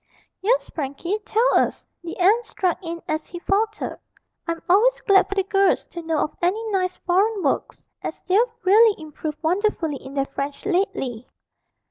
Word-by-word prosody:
'Yes, 485 +6 +2
Frankie, 315 +7 -3
tell 455 +3 +3
us,' - - -1 0.2
the 340 - -6
aunt 405 +6 +4
struck 365 -6 -1
in 335 -1 -6
as 310 0 -2
he 350 - -8
faltered; 425 +4 -1 0.5
'I'm 335 0 -2
always 435 +8 +4
glad 395 -2 +4
for 395 - -3
the 390 - +2
girls 390 0 +2
to 345 - -6
know 325 -1 -1
of 300 - -1
any 390 +6 0
nice 370 -2 0
foreign 390 +3 +2
works, 275 - -1 0.2
as - - -5
they've 375 +3 +2 0.2
really 420 +2 +5
improved 310 -1 -6
wonderfully 340 -4 0
in 265 +1 -11
their 275 -1 +1
French 280 +1 -5
lately.' 355 - -1
365 Hz, 165 wpm, -23 LUFS, 315-405 Hz, 0.5 s, really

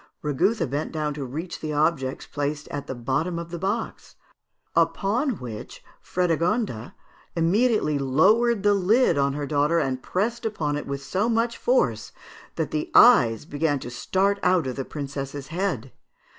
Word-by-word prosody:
Rigouthe 165 - +1
bent 145 +4 -3
down 150 -2 -2
to 145 -1 -5
reach 155 +8 -6
the 155 -1 -4
objects 145 -3 0
placed 145 +1 -3
at 145 -1 -5
the 130 - -4
bottom 135 +9 -1
of 170 0 -6
the 170 - -5
box; 200 +5 -3 0.6
upon 230 +4 +1
which 115 -4 -8 0.2
Frédégonde 175 - 0 0.4
immediately 175 - +2
lowered 195 - +3
the 205 0 +5
lid 200 +2 +3
on 140 0 +2
her 145 0 -3
daughter, 150 +3 +1
and 130 -5 -1
pressed 225 - -2
upon 160 -10 -1
it 145 - -5
with 140 0 -4
so 195 +10 0
much 230 +1 +1
force - - 0 0.4
that - - -2
the 315 +3 -2
eyes 120 - +6
began 145 -1 0
to 125 -2 -7
start 195 +10 0
out 180 -5 +3
of 130 -1 -3
the 135 - -4
princess's 140 -1 -6
head. 165 - -2
160 Hz, 155 wpm, -25 LUFS, 140-200 Hz, 0.6 s, eyes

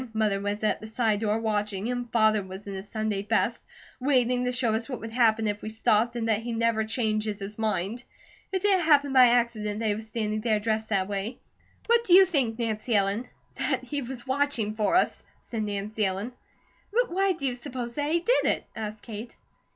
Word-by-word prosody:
Mother 210 -2 +1
was 205 +1 -3
at 215 - +1
the 215 - -7
side 220 -2 +1
door 215 0 +1
watching, 210 0 -1
and 245 -1 -4
Father 215 -2 +3
was 190 +1 -9
in 200 - -6
his 195 +2 -7
Sunday 215 -3 -2
best, 225 +3 0 0.4
waiting 250 -2 +2
to 250 - +1
show 245 -3 +1
us 225 +4 -2
what 255 - -4
would 225 0 -7
happen 225 -2 +3
if 205 -1 -1
we 215 - -5
stopped, 220 +1 +2
and 230 -1 -2
that 220 -1 +1
he 235 0 -4
never 230 -1 +1
changes 215 -2 -1
his 200 +2 -7
mind. 215 +2 -1 0.5
It 380 -1 -1
didn't 385 -4 +3
happen 285 -3 +4
by 255 -2 +8
accident 230 -3 +1
that 225 - -2
he 210 - +2
was 220 +1 -7
standing 215 -1 -2
there 215 -2 +1
dressed 220 0 -1
that 195 -3 +1
way. 205 +4 -3 0.5
What 470 0 +4
do 360 -6 +5
you 385 +1 +9
think, 265 -11 0
Nancy 225 0 -1
Ellen?" 200 +4 +1 0.3
"That - - 0
he 290 -1 -3
was 250 0 -7
watching 260 -5 0
for 215 +7 +1
us!" 365 - +2 0.2
said 225 -2 -4
Nancy 210 +1 -2
Ellen. 195 +5 -2 0.6
"But - - +1
why 385 +1 +2
do 305 -5 -6
you 255 - +1
suppose 245 -1 -6
that 290 +2 -2
he 340 +1 +2
did 485 +7 +2
it?" - - +1
asked 215 -1 -6
Kate. 225 +1 -8
225 Hz, 215 wpm, -27 LUFS, 210-250 Hz, 0.6 s, you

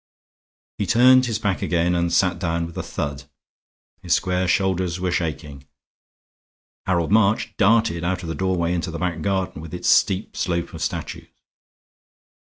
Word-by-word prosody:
He - - -1
turned 130 +2 +5
his 115 -2 -1
back 100 -4 -2
again 85 0 +1
and 85 -1 0
sat 90 -1 +2
down 85 -1 -1
with 85 - -10
a - - -3
thud; 70 -1 -5 0.8
his 90 -2 +2
square 90 -1 0
shoulders 95 -2 0
were 90 0 -1
shaking. 75 -5 -4 1.2
Harold 85 -1 0
March 110 0 +2
darted 110 -5 +2
out 90 +1 -2
of 85 - -6
the - - -2
doorway 90 0 -1
into 90 0 -2
the 85 - -5
back 90 0 -2
garden 95 -5 -2
with 80 +1 -8
its 90 - -1
steep 95 +1 +2
slope 85 -2 -2
of 80 - -8
statues. 80 - -4
90 Hz, 155 wpm, -22 LUFS, 85-95 Hz, 1.2 s, turned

